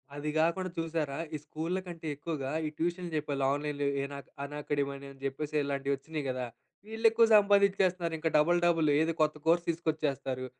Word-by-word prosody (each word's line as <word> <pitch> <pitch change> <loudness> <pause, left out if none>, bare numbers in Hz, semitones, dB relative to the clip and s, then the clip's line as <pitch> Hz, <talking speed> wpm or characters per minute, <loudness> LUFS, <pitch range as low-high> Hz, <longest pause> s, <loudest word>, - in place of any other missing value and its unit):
అది 150 +1 -3
గాకుండా 180 +3 +1
చూసారా? 160 -4 -2 0.2
ఈ - - -1
స్కూల్లకంటే 170 +1 -4
ఎక్కువగా 145 -3 -4 0.2
ఈ - - -2
ట్యూషన్ 175 +1 -2
జెప్పే 150 -2 -1 0.2
ఆన్లైన్‌లో 145 0 -1 0.2
ఎనా 140 0 -5 0.3
అనకాడమీ 145 -1 -2
అని 140 0 -9
అని 135 - -16
జెప్పేసి 145 +3 -3
ఇలాంటివి 140 0 -1
వచ్చినాయి 150 +2 -5
గదా! 125 -1 -2 0.5
ఈళ్ళు 225 +1 -4
ఎక్కువ 230 +1 +5
సంపాదించేస్తున్నారు 190 -4 +3
ఇంకా. 160 +1 0
డబుల్ 175 +4 +4
డబుల్ 165 -3 +3
ఏదో 160 +1 +2
కొత్త 155 0 +3
కోర్స్ 170 +1 +4
తీసుకొచ్చేస్తారు. 150 -6 -1
155 Hz, 160 wpm, -31 LUFS, 140-170 Hz, 0.5 s, ఎక్కువ